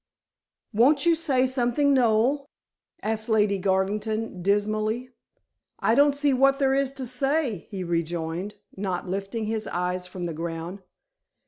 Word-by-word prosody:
"Won't 275 Hz, +8 st, +4 dB
you 340 Hz, -, +5 dB
say 280 Hz, -6 st, +2 dB
something, 260 Hz, +2 st, +2 dB
Noel?" 255 Hz, +3 st, +2 dB, 0.6 s
asked 220 Hz, +1 st, -1 dB
Lady 210 Hz, -3 st, +2 dB
Garvington 200 Hz, +2 st, -1 dB
dismally. 215 Hz, +5 st, 0 dB, 0.7 s
"I 225 Hz, -, +2 dB
don't 285 Hz, +2 st, +4 dB
see 285 Hz, -1 st, +2 dB
what 270 Hz, +1 st, +4 dB
there 270 Hz, -1 st, +2 dB
is 275 Hz, -1 st, +1 dB
to 270 Hz, -1 st, -5 dB
say," 255 Hz, -, -1 dB
he 190 Hz, -2 st, -4 dB
rejoined, 170 Hz, +3 st, -3 dB, 0.2 s
not 190 Hz, -2 st, -3 dB
lifting 195 Hz, +4 st, -3 dB
his 220 Hz, 0 st, -2 dB
eyes 180 Hz, +1 st, -2 dB
from 180 Hz, 0 st, -7 dB
the 170 Hz, -1 st, -3 dB
ground. 165 Hz, +4 st, -5 dB
215 Hz, 135 wpm, -25 LUFS, 190-265 Hz, 0.7 s, you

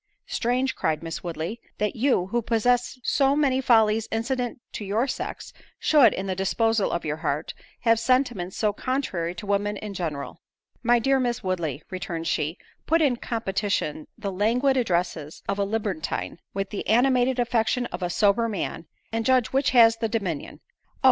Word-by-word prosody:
"Strange," 255 Hz, +2 st, 0 dB
cried 155 Hz, 0 st, -1 dB
Miss 165 Hz, 0 st, -5 dB
Woodley, 170 Hz, +6 st, -4 dB, 0.2 s
"that 210 Hz, -1 st, -1 dB
you, 240 Hz, -6 st, +2 dB
who 235 Hz, +5 st, -1 dB
possess 245 Hz, +3 st, +1 dB
so 275 Hz, +1 st, +3 dB
many 270 Hz, -3 st, +2 dB
follies 225 Hz, -3 st, +4 dB
incident 245 Hz, +2 st, -2 dB
to -, -, -5 dB
your 210 Hz, +5 st, +1 dB
sex, 270 Hz, -, -5 dB, 0.2 s
should, 280 Hz, -8 st, +5 dB
in 190 Hz, -, -3 dB
the 190 Hz, -, -1 dB
disposal 210 Hz, +3 st, +1 dB
of 170 Hz, -, -2 dB
your 155 Hz, 0 st, -2 dB
heart, 150 Hz, 0 st, -2 dB, 0.3 s
have 230 Hz, -1 st, +4 dB
sentiments 240 Hz, -7 st, +1 dB
so 210 Hz, -2 st, +1 dB
contrary 200 Hz, -10 st, -2 dB
to 180 Hz, -, -7 dB
women 205 Hz, +1 st, 0 dB
in 210 Hz, 0 st, -6 dB
general." 160 Hz, -7 st, -4 dB, 0.4 s
"My 240 Hz, 0 st, +4 dB
dear 270 Hz, +3 st, +2 dB
Miss 245 Hz, -2 st, -1 dB
Woodley," 165 Hz, -6 st, -2 dB
returned 180 Hz, -3 st, -4 dB
she, 160 Hz, +1 st, -1 dB, 0.3 s
"put 330 Hz, +2 st, +4 dB
in 280 Hz, -6 st, +2 dB
competition 205 Hz, -, -2 dB
the 205 Hz, -3 st, -4 dB
languid 235 Hz, +8 st, +2 dB
addresses 175 Hz, -, -1 dB
of 200 Hz, 0 st, -1 dB
a -, -, +3 dB
libertine, 200 Hz, -6 st, -3 dB
with 195 Hz, 0 st, -3 dB
the 205 Hz, -, -4 dB
animated 250 Hz, +2 st, +3 dB
affection 240 Hz, 0 st, +1 dB
of 175 Hz, -, -5 dB
a 180 Hz, -, -1 dB
sober 210 Hz, +5 st, +2 dB
man, 170 Hz, -5 st, -4 dB, 0.2 s
and 225 Hz, 0 st, -1 dB
judge 255 Hz, -1 st, +3 dB
which 270 Hz, +1 st, +3 dB
has 230 Hz, -2 st, +6 dB
the 225 Hz, -1 st, -1 dB
dominion? 190 Hz, -9 st, -3 dB, 0.3 s
Oh! -, -, -41 dB
220 Hz, 170 wpm, -25 LUFS, 185-245 Hz, 0.4 s, has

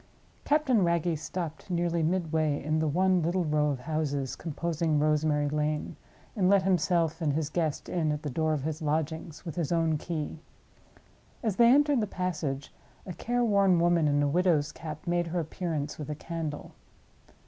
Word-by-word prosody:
Captain 280 Hz, -8 st, +3 dB
Wragge 170 Hz, -1 st, +1 dB
stopped 160 Hz, +2 st, -5 dB
nearly 170 Hz, -1 st, 0 dB
midway 160 Hz, -3 st, 0 dB
in 155 Hz, +2 st, 0 dB
the 160 Hz, -, +1 dB
one 185 Hz, +4 st, +2 dB
little 175 Hz, +3 st, 0 dB
row 150 Hz, -1 st, +2 dB
of 135 Hz, -3 st, -3 dB
houses 145 Hz, -2 st, -2 dB
composing 165 Hz, 0 st, -1 dB
Rosemary 150 Hz, 0 st, +2 dB
Lane, 150 Hz, +1 st, -1 dB, 0.4 s
and 190 Hz, -4 st, +2 dB
let 200 Hz, -1 st, +5 dB
himself 170 Hz, -3 st, +1 dB
and 150 Hz, -3 st, +1 dB
his 155 Hz, 0 st, -2 dB
guest 160 Hz, -4 st, -1 dB
in 160 Hz, -4 st, 0 dB
at 150 Hz, 0 st, -3 dB
the 150 Hz, -, -2 dB
door 155 Hz, +3 st, +1 dB
of 145 Hz, -3 st, -2 dB
his 155 Hz, +1 st, -3 dB
lodgings 160 Hz, +1 st, -2 dB
with 165 Hz, -, -4 dB
his 170 Hz, -4 st, -2 dB
own 165 Hz, -2 st, +1 dB
key. 160 Hz, -2 st, -4 dB, 1.0 s
As 215 Hz, -5 st, -1 dB
they 235 Hz, -, +7 dB
entered 285 Hz, -1 st, +4 dB
the 210 Hz, -, -1 dB
passage, 155 Hz, -8 st, -3 dB, 0.3 s
a 180 Hz, -, -6 dB
care 245 Hz, +6 st, -1 dB
worn 200 Hz, -5 st, +4 dB
woman 170 Hz, -2 st, +3 dB
in 145 Hz, 0 st, +2 dB
a -, -, +2 dB
widow's 160 Hz, -1 st, +2 dB
cap 155 Hz, -2 st, -8 dB
made 175 Hz, 0 st, 0 dB
her 175 Hz, +2 st, -1 dB
appearance 155 Hz, -3 st, -3 dB
with 150 Hz, -, -6 dB
a 150 Hz, -, -3 dB
candle. 160 Hz, -1 st, -5 dB
160 Hz, 175 wpm, -29 LUFS, 150-180 Hz, 1.0 s, they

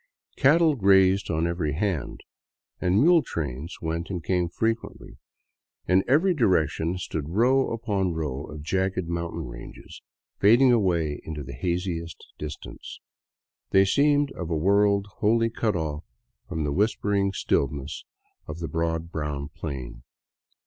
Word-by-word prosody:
Cattle 155 Hz, +3 st, +4 dB
grazed 95 Hz, -2 st, +4 dB
on 80 Hz, 0 st, 0 dB
every 85 Hz, -4 st, -1 dB
hand, 90 Hz, -1 st, -2 dB, 0.6 s
and 90 Hz, +2 st, +2 dB
mule 170 Hz, +5 st, +6 dB
trains 75 Hz, -, -5 dB
went 85 Hz, +1 st, -3 dB
and 90 Hz, -4 st, -4 dB
came 90 Hz, -1 st, 0 dB
frequently. 115 Hz, +5 st, -3 dB, 0.7 s
In 95 Hz, +2 st, +4 dB
every 160 Hz, +9 st, +4 dB
direction 90 Hz, -, +1 dB
stood 80 Hz, -4 st, -4 dB
row 125 Hz, +8 st, +3 dB
upon 100 Hz, -6 st, -1 dB
row 75 Hz, -3 st, -3 dB
of 75 Hz, -1 st, -9 dB
jagged 95 Hz, +1 st, -1 dB
mountain 85 Hz, 0 st, -3 dB
ranges, -, -, -11 dB, 0.4 s
fading 120 Hz, +6 st, +6 dB
away 85 Hz, -10 st, +1 dB
into 75 Hz, -2 st, -6 dB
the 70 Hz, +1 st, -8 dB
haziest 85 Hz, +3 st, -3 dB
distance. 75 Hz, -1 st, -8 dB, 0.7 s
They 95 Hz, 0 st, +5 dB
seemed 145 Hz, +5 st, +3 dB
of 85 Hz, -3 st, -6 dB
a 80 Hz, -, 0 dB
world 100 Hz, +3 st, +3 dB
wholly 115 Hz, +2 st, +2 dB
cut 110 Hz, -3 st, -1 dB
off 80 Hz, -2 st, -3 dB, 0.5 s
from 80 Hz, -, -2 dB
the 70 Hz, -1 st, -1 dB
whisper 105 Hz, +2 st, 0 dB
ing 100 Hz, -1 st, +2 dB
stillness 70 Hz, -4 st, -1 dB, 0.4 s
of 75 Hz, -, -6 dB
the 85 Hz, -1 st, -4 dB
broad 80 Hz, 0 st, -2 dB
brown 75 Hz, -3 st, -4 dB
plain. 65 Hz, -6 st, -7 dB
90 Hz, 135 wpm, -25 LUFS, 80-105 Hz, 0.7 s, mule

